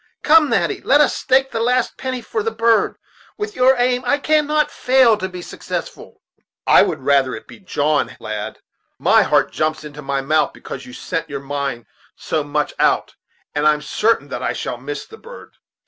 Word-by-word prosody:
Come, 305 Hz, -1 st, +5 dB
Natty, 185 Hz, -7 st, 0 dB
let 285 Hz, -, +4 dB
us 295 Hz, -, +3 dB
stake 265 Hz, +1 st, +2 dB
the 225 Hz, -, -2 dB
last 245 Hz, +1 st, +1 dB
penny 255 Hz, -2 st, -4 dB
for 435 Hz, -, -3 dB
the 450 Hz, -, -1 dB
bird; 230 Hz, -, +2 dB, 0.4 s
with 420 Hz, 0 st, -5 dB
your 255 Hz, +1 st, +5 dB
aim, 250 Hz, +1 st, +1 dB
it 285 Hz, 0 st, 0 dB
cannot 305 Hz, 0 st, +2 dB
fail 255 Hz, -3 st, +4 dB
to 190 Hz, -2 st, -4 dB
be 180 Hz, -1 st, -8 dB
successful." -, -, -7 dB, 0.4 s
"I -, -, +6 dB
would -, -, 0 dB
rather 135 Hz, -3 st, +2 dB
it 110 Hz, -, -8 dB
should -, -, -34 dB
be -, -, -13 dB
John, 155 Hz, -6 st, -1 dB
lad; 105 Hz, -1 st, -5 dB, 0.4 s
my -, -, +4 dB
heart -, -, +2 dB
jumps 155 Hz, 0 st, -1 dB
into 150 Hz, 0 st, -9 dB
my 140 Hz, -1 st, -2 dB
mouth, 155 Hz, +3 st, +1 dB
because -, -, -9 dB
you 125 Hz, -, -11 dB
set 165 Hz, +4 st, -4 dB
your 140 Hz, -1 st, -4 dB
mind 140 Hz, -3 st, -4 dB, 0.3 s
so 155 Hz, -2 st, -2 dB
much 150 Hz, +1 st, -2 dB
out; -, -, +2 dB, 0.4 s
and 145 Hz, +1 st, +1 dB
I'm 150 Hz, 0 st, +2 dB
sartain 210 Hz, -9 st, 0 dB
that -, -, -5 dB
I -, -, -1 dB
shall 125 Hz, -, -4 dB
miss 140 Hz, +3 st, -6 dB
the 445 Hz, -, -13 dB
bird. -, -, -13 dB
185 Hz, 195 wpm, -19 LUFS, -, 0.4 s, I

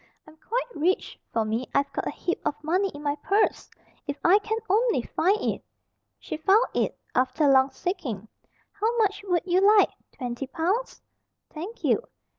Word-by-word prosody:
"I'm 310 Hz, -, -15 dB
quite 475 Hz, +9 st, -2 dB
rich, 345 Hz, +4 st, 0 dB
for 225 Hz, -1 st, 0 dB
me. 225 Hz, +4 st, -2 dB
I've 280 Hz, 0 st, +1 dB
got -, -, -2 dB
a -, -, 0 dB
heap 350 Hz, -, -3 dB
of 290 Hz, -, 0 dB
money 365 Hz, +6 st, +1 dB
in 290 Hz, -4 st, -10 dB
my 290 Hz, -1 st, 0 dB
purse, 400 Hz, +8 st, +1 dB, 0.4 s
if 285 Hz, 0 st, -3 dB
I 385 Hz, +4 st, +7 dB
can 440 Hz, +1 st, -2 dB
only 430 Hz, -, +2 dB
find 390 Hz, -, +1 dB
it." -, -, -2 dB, 0.5 s
She -, -, -6 dB
found 390 Hz, +9 st, +4 dB
it, -, -, 0 dB, 0.2 s
after 260 Hz, +4 st, +2 dB
long 265 Hz, -1 st, +5 dB
seeking. 265 Hz, -, -4 dB, 0.4 s
"How 445 Hz, +4 st, -1 dB
much 415 Hz, -3 st, +1 dB
would 355 Hz, -2 st, +1 dB
you 365 Hz, 0 st, +3 dB, 0.2 s
like 405 Hz, -, +5 dB, 0.2 s
twenty 250 Hz, +1 st, -5 dB
pounds?" 375 Hz, -, -2 dB, 0.5 s
"Thank 365 Hz, +9 st, -7 dB
you." -, -, +3 dB
340 Hz, 170 wpm, -26 LUFS, 280-405 Hz, 0.5 s, I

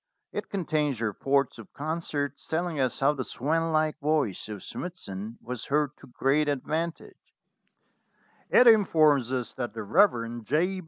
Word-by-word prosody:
It -, -, -5 dB
contains 150 Hz, -, -1 dB
reports 135 Hz, +5 st, 0 dB
of 115 Hz, -, -12 dB
concerts 145 Hz, -2 st, -3 dB
telling 165 Hz, -1 st, -1 dB
us 130 Hz, -1 st, 0 dB
how 140 Hz, +2 st, +4 dB
the 135 Hz, -3 st, -3 dB
swan 165 Hz, +7 st, -1 dB
like 155 Hz, -1 st, +1 dB
voice 145 Hz, -10 st, 0 dB
of 105 Hz, -3 st, -7 dB
Smithson 110 Hz, -, -6 dB
was 125 Hz, -1 st, -5 dB
heard 145 Hz, -1 st, +1 dB
to -, -, -15 dB
great 140 Hz, +4 st, +1 dB
advantage; 155 Hz, +4 st, -4 dB, 1.1 s
it 250 Hz, -, +6 dB
informs 155 Hz, -, +5 dB
us 125 Hz, -4 st, -2 dB
that 120 Hz, -3 st, -5 dB
the 110 Hz, -, -4 dB
Rev. 120 Hz, -, +2 dB
J. 175 Hz, -, 0 dB
145 Hz, 145 wpm, -27 LUFS, 120-160 Hz, 1.1 s, it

